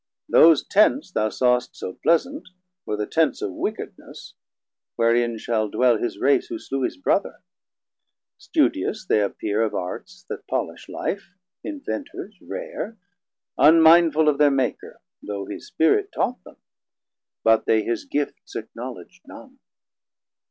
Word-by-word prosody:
Those 160 -3 +6
Tents 215 +3 +2
thou 110 -9 0
sawst 125 +3 +1
so 95 - -6
pleasant, 180 - 0 0.4
were 105 - -2
the 105 - -2
Tents 160 +3 +1
Of - - -3
wickedness, - - -6 0.6
wherein 115 0 +2
shall 110 -1 -1
dwell 125 +1 +3
his 120 - -3
Race 140 - +2
Who 345 0 -5
slew 135 - -4
his - - -2
Brother; 280 - -1 1.0
studious 295 -8 0
they 110 - +2
appere 105 +1 -1
Of 110 - -2
Arts 90 0 -6
that - - -7
polish - - -4
Life, 200 0 -5 0.3
Inventers 285 -7 -6
rare, - - -6 0.6
Unmindful 160 +1 +6
of 150 -1 +2
thir 150 -1 +6
Maker, 135 -3 -2 0.2
though 100 -1 -5
his 100 - -8
Spirit 395 - +2
Taught 250 - -2
them, - - -16 0.9
but 115 0 +3
they 110 -1 +3
his 115 0 -3
gifts 145 0 -4
acknowledg'd - - -8
none. - - -13
140 Hz, 130 wpm, -23 LUFS, -, 1.0 s, Those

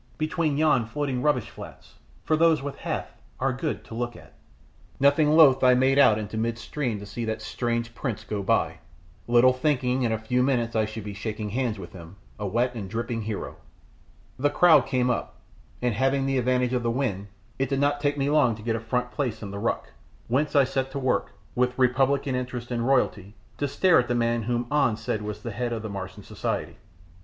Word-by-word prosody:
between 155 -2 0
yon 150 -5 +3
floating 130 +2 -3
rubbish 145 -6 +1
flats, - - -12 0.3
for 155 - +2
those 160 -3 +3
with 145 -1 -4
Hath - - -4 0.3
are 130 0 +1
good 150 +5 -3
to - - -11
look 120 +1 -3
at." - - -15 0.7
Nothing 145 +2 +4
loth 135 -5 +7
I 125 0 +6
made 135 +2 +3
out 110 -6 +6
into 110 0 -5
mid 115 +1 -1
stream 125 -4 -3
to 100 - -8
see 120 +3 -5
that 110 0 -2
strange 115 -1 -2
prince 115 -3 -4
go 105 -1 -3
by, 95 - 0 0.5
little 120 +2 +5
thinking 130 -2 0
in 120 -3 +1
a 110 - +1
few 125 +3 0
minutes 120 -3 0
I 110 -1 +2
should 110 0 -7
be 105 -1 -6
shaking 105 +1 -4
hands 120 -2 -1
with 90 -3 -9
him, 85 0 -11 0.2
a 105 - -2
wet 120 +5 0
and 105 -5 -6
dripping 115 +2 -3
hero. 110 -1 -5 0.8
The 145 +2 +3
crowd 155 -3 +5
came 125 -2 +1
up, 120 - -3 0.5
and 120 -2 +2
having 135 +4 +1
the 135 -1 +1
advantage 125 0 +1
of 125 - +1
the 115 - 0
wind, 115 -6 -2 0.3
it 135 -1 0
did 135 -1 0
not 145 0 +1
take 145 0 0
me 135 0 0
long 145 -6 +3
to 105 - -12
get 115 0 0
a - - -2
front 125 +2 -2
place 120 -7 -3
in 100 - -6
the 100 - -5
ruck, - - -2 0.4
whence 145 +6 0
I 140 - +7
set 135 0 -2
to - - -3
work, 130 -2 0 0.2
with 125 0 0
republican 135 +2 +2
interest 125 -1 -4
in 120 -1 -1
royalty, 110 -6 0 0.2
to 145 - 0
stare 160 +5 +4
at 120 - 0
the 120 - 0
man 115 0 +1
who 120 +2 -1
An 145 -7 +2
said 110 -1 -3
was 105 0 -6
the 115 - -4
head 120 +3 -3
of 115 -2 -3
Martian 95 -1 -7
society. - - -4
125 Hz, 210 wpm, -26 LUFS, 110-135 Hz, 0.8 s, loth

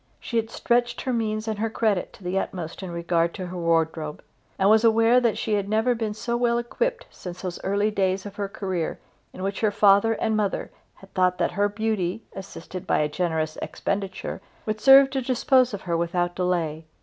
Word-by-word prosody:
She 235 - -3
had 225 -1 0
stretched 240 +1 0
her 260 - -2
means 215 -1 -1
and 215 -2 -2
her 225 +1 0
credit 215 -4 0
to 195 - -16
the 180 +2 0
utmost 175 -3 -5
in 190 - -6
regard 170 0 0
to 185 - -5
her 180 +1 -7
wardrobe, 160 -3 0 0.3
and 190 - +3
was 220 +2 +5
aware 230 +2 +5
that 235 -3 +1
she 220 - -1
had 200 -1 0
never 220 +3 +2
been 220 -3 -3
so 235 +2 -2
well 240 -1 +2
equipped 475 - -2
since 180 0 -9
those 180 -2 -4
early 200 +2 +1
days 190 -1 0
of 205 0 -9
her 200 -1 -2
career 190 -5 -3 0.3
in 185 - -8
which 195 0 -2
her 215 - +3
father 205 +2 +4
and 220 0 0
mother 210 -2 -1 0.2
had 195 - -18
thought 180 -1 +2
that - - 0
her 205 +3 +1
beauty, 215 -2 -2
assisted 190 -1 -8
by - - +2
a 150 - +2
generous 160 -1 -2
expenditure, 195 -1 -3 0.2
would 215 0 -3
serve 270 0 +8
to 270 -1 -1
dispose 255 0 +3
of 200 -2 -5
her 170 -2 -1
without 175 +1 0
delay. 170 -4 -1
200 Hz, 205 wpm, -25 LUFS, 180-225 Hz, 0.3 s, serve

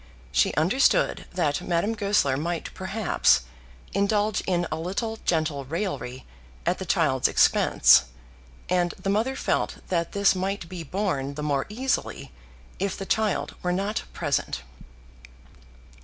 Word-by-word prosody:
She 60 0 +3
understood 235 - +2
that 150 -6 0
Madame 180 +6 0
Goesler 200 -10 +2
might 165 +4 -3
perhaps 185 - +2 0.5
indulge 205 +1 +1
in 175 -2 +1
a - - 0
little 220 +6 -3
gentle 155 -4 0
raillery 135 -5 -4 0.4
at - - +1
the - - -6
child's - - +2
expense, - - +5 0.6
and 175 -1 +1
the 195 - -2
mother 225 +6 0
felt - - -1
that 170 -2 -1
this 200 -1 +4
might 190 -1 -3
be 180 0 -7
borne 145 -5 -2
the 150 - -5
more 140 -2 0
easily 250 +5 -2 0.5
if 195 0 -1
the 195 - -5
child 215 0 0
were 180 - 0
not 200 +4 -1
present. 145 -5 -2
185 Hz, 130 wpm, -25 LUFS, 155-205 Hz, 0.6 s, expense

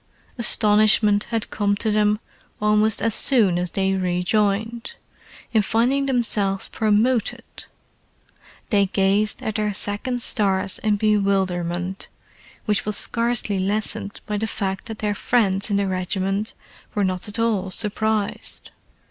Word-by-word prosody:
Astonishment 210 -2 +5
had 225 -2 -3
come 205 -1 0
to 215 +2 -1
them 210 0 +2 0.4
almost 210 0 +2
as 225 -1 +1
soon 210 -11 +3
as 180 0 -2
they 195 +2 0
rejoined, 200 - -1 0.6
in 220 - +4
finding 250 +7 +1
themselves 210 -6 +1
promoted; 220 +2 +1 1.3
they 200 -2 +3
gazed 195 +2 +1
at 220 - -2
their 210 0 -1
second 230 +6 -2
stars 195 -2 -1
in 215 -1 +1
bewilderment 190 -3 -1 0.6
which 210 -2 0
was 210 -1 0
scarcely 230 -4 +1
lessened 200 +1 -2
by 210 - -3
the 220 +2 -2
fact 195 -3 -4
that 220 -2 -7
their 210 -1 -1
friends 200 -2 +1
in 200 - +1
the 200 - +1
regiment 190 +2 -2 0.4
were 205 - +1
not 185 0 -1
at 205 - -4
all 220 -5 0
surprised. 215 +1 -2
210 Hz, 130 wpm, -22 LUFS, 195-220 Hz, 1.3 s, Astonishment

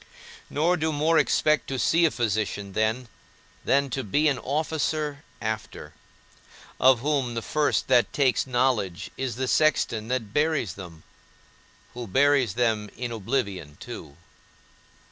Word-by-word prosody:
Nor 170 +5 +1
do 160 0 0
more 155 +2 +3
expect 155 0 +2
to 135 - -3
see 165 +6 +3
a - - +4
physician 105 -5 -2
then, 110 +4 0 0.6
than 140 -1 +2
to 135 +2 -2
be 145 +9 +1
an 140 -3 +1
officer 150 0 -2 0.2
after; 110 -1 -5 0.9
of 130 -2 +5
whom, 135 -4 0
the 115 - -3
first 150 -1 0
that 125 -2 +4
takes 135 -2 +1
knowledge, 120 -8 0
is 130 -4 -3
the 130 +1 -2
sexton 120 -5 +2
that 115 -4 -3
buries 150 - +1
them, 85 -4 -11 0.9
who 120 -1 -6
buries 135 -1 +3
them 110 -3 0
in 125 0 -4
oblivion 100 - -3
too! 70 - -9
125 Hz, 135 wpm, -26 LUFS, 110-145 Hz, 0.9 s, of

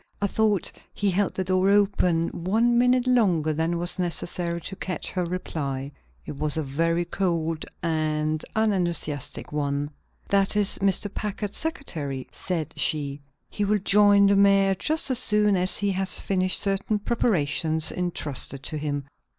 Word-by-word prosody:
I 205 - 0
thought 210 -2 +1 0.2
he 205 -1 +1
held 195 +2 0
the 190 - -1
door 185 +1 +2
open 195 -5 +2
one 225 +7 +1
minute 250 +1 +3
longer 185 -12 +2
than 165 +3 -1
was 175 +2 -3
necessary 175 -1 -2
to 190 - -6
catch 180 -4 -4
her 180 - -1
reply. 145 -6 -4 0.3
It 140 - -7
was 155 +1 0
a 160 - 0
very 165 +5 0
cold 165 -3 -1 0.2
and 155 -1 -1
unenthusiastic 175 -9 -1
one. 145 0 -2 0.4
"That 195 0 +2
is 205 -2 +2
Mr. 195 +1 0
Packard's 210 -1 -4
secretary," 155 - -4
said 170 -5 -4
she. 145 -1 0 0.3
"He 205 - -3
will 210 +1 +2
join 205 0 +5
the 200 0 +4
mayor 195 -1 +4
just 305 - 0
as 250 - +2
soon 210 -3 +2
as 180 0 +2
he 205 -1 0
has 190 0 0
finished 185 -1 0
certain 200 +2 0
preparations 160 -8 +1
intrusted 145 -6 -3
to 155 - -3
him." 145 -1 -2
180 Hz, 150 wpm, -25 LUFS, 155-200 Hz, 0.4 s, join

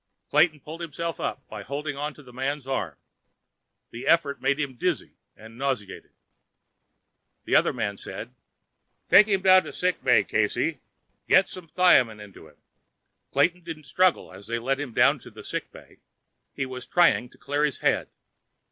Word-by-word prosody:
Clayton 155 -4 +3
pulled 160 +4 -9
himself 170 +1 -4
up 135 - -4
by 105 -1 -8
holding 145 +6 -4 0.2
to 150 - -15
the 125 -2 -15
man's 135 +2 -3
arm. 95 - -3 0.9
The 120 - -8
effort 150 -4 +2
made 140 +2 +1
him 140 -3 -2
dizzy 120 - -2 0.2
and 110 +2 -14
nauseated. 130 -8 -3 1.4
The - - +1
other - - +4
man 100 0 -3
said: - - -8 0.8
"Take 210 - +8
him 195 -3 0
down 185 -1 +7
to - - -7
sick 180 0 -1
bay, - - +4
Casey. - - 0 0.5
Get 190 0 +5
some 180 -3 -9
thiamin 130 -12 +4
into 100 -6 -13
him." 75 - -22 0.7
Clayton 180 0 +1
didn't 165 -2 -8
struggle 180 - +1
as 95 +2 -12
they 115 +1 -1
led 135 +4 -1
him 145 -4 -5
down - - +4
to - - -13
the - - -12
sick - - -5
bay. - - -16 0.5
He 135 - -3
was 130 -1 -8
trying 175 -8 +3
to - - -22
clear 145 +1 -2
his 145 -4 -1
head. - - +1
140 Hz, 165 wpm, -25 LUFS, 120-170 Hz, 1.4 s, Take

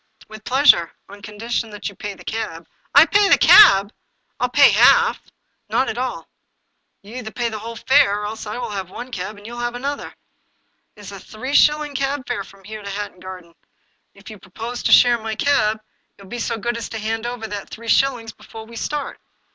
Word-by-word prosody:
" - - -22
With 215 0 -12
pleasure, 260 - +4 0.2
on 200 +1 -13
condition 220 +2 -4
that 210 -1 -7
you 200 - -6
pay 200 +1 -7
the - - -15
cab." 170 -7 -5
" - - -27
I 285 +3 +9
pay 405 +2 +3
the - - +6
cab! 205 - +7 0.5
I - - +1
will - - -3
pay - - +6
half." 470 -1 +4 0.2
" - - -49
Not 265 - 0
at 230 - -4
all. 255 0 -4 0.8
You 205 - -14
will 250 - -6
either 220 -3 -7
pay 235 +1 -3
the 220 -1 -6
whole 230 +2 -8
fare, 230 -5 +3
or - - -4
else 215 +1 -7
I 210 - -5
will 240 -3 -5
have 190 -3 -5
one 245 +6 -9
cab 205 +1 -6
and 205 - -16
you 235 - -8
shall 240 - -7
have 240 0 -3
another. 280 +3 -4 0.9
It 210 - -15
is 200 -1 -10
a 195 - -9
three 255 +9 -8
shilling 300 0 +3
cab 275 0 -3
fare 240 -5 -3
from 195 0 -18
here 215 +2 -9
to 200 - -8
Hatton 200 -2 -6
Garden. 180 -2 -11 0.6
If 200 +2 -13
you 215 - -12
propose 225 +6 -7
to - - 0
share 240 -1 +6
my 220 0 -5
cab, 220 -5 +1 0.4
you 200 - -15
will 190 - -15
be 240 - -5
so 230 0 -2
good 235 +2 -3
as 230 - -6
to 225 - -6
hand 225 +2 -3
over 240 -2 -6
that 205 -2 -7
three 230 +1 -10
shillings 240 -2 +1
before 220 +1 -12
we 230 +1 -12
start." 295 +4 -4
225 Hz, 235 wpm, -20 LUFS, 205-245 Hz, 0.9 s, I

